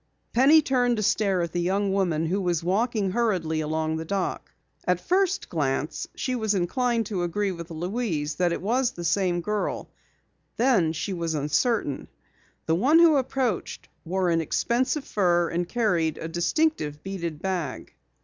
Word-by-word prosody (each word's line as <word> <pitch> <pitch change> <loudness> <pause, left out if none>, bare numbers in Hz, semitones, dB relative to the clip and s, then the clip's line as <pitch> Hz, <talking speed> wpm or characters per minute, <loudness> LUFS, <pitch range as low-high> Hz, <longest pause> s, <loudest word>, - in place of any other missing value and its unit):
Penny 290 +6 +6
turned 245 -3 +1
to 215 - -1
stare 195 -3 +2
at 170 - -4
the 175 - -1
young 195 +2 0
woman 170 -5 +1
who 190 +5 0
was 175 -3 0
walking 205 +2 0
hurriedly 185 -8 0
along 155 +1 -1
the 160 - -4
dock. 190 +3 -3 0.4
At 180 -1 +2
first 380 - +1
glance 145 -1 -2
she 255 - -2
was 220 -4 0
inclined 230 +6 0
to 195 -3 -3
agree 195 +3 -1
with 170 -1 -8
Louise 170 -3 -2
that 180 -1 +2
it 170 - -3
was 245 +4 +1
the 175 - -7
same 175 +1 +1
girl, 210 +4 -3 0.7
then 230 -10 +3
she 165 +5 -3
was 165 -2 -2
uncertain. 150 - 0 0.6
The 160 - +1
one 260 - +4
who 335 -2 +6
approached 255 -5 -2
wore 180 +1 0
an 165 0 +2
expensive 255 - 0
fur 175 -4 +2
and 175 +1 -2
carried 180 -10 +1
a 165 - -5
distinctive 175 - 0
beaded 170 -5 -4
bag. 175 -7 -4
185 Hz, 160 wpm, -25 LUFS, 165-235 Hz, 0.7 s, Penny